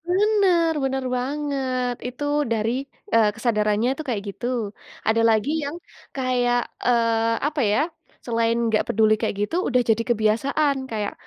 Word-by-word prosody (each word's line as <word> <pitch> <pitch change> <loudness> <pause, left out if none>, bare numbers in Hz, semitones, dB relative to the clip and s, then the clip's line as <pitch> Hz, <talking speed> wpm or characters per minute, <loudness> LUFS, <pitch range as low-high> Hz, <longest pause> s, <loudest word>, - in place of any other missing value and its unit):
Bener 375 -4 +3
bener 265 0 -1
banget, 260 -2 -2
itu 250 +3 -6 0.3
dari, 225 0 +1 0.4
eee, 225 -2 +5
kesadarannya 215 -1 +1
itu 310 - -7
kayak 225 -6 -1
gitu. 200 - -7 0.6
Ada 225 +1 +3
lagi 220 +4 +2
yang 285 +3 -4 0.4
kayak, 250 -2 +1 0.3
eee, 230 -2 +3 0.3
apa, 300 0 -3
ya, - - +2 0.5
selain 230 -1 +1
nggak 220 -1 +2
peduli 215 0 +3
kayak - - -1
gitu, 270 - -5
udah 250 -1 +3
jadi 225 +1 +3
kebiasaan. 240 +6 +2 0.2
Kayak, 210 -2 -2
245 Hz, 140 wpm, -23 LUFS, 225-275 Hz, 0.6 s, eee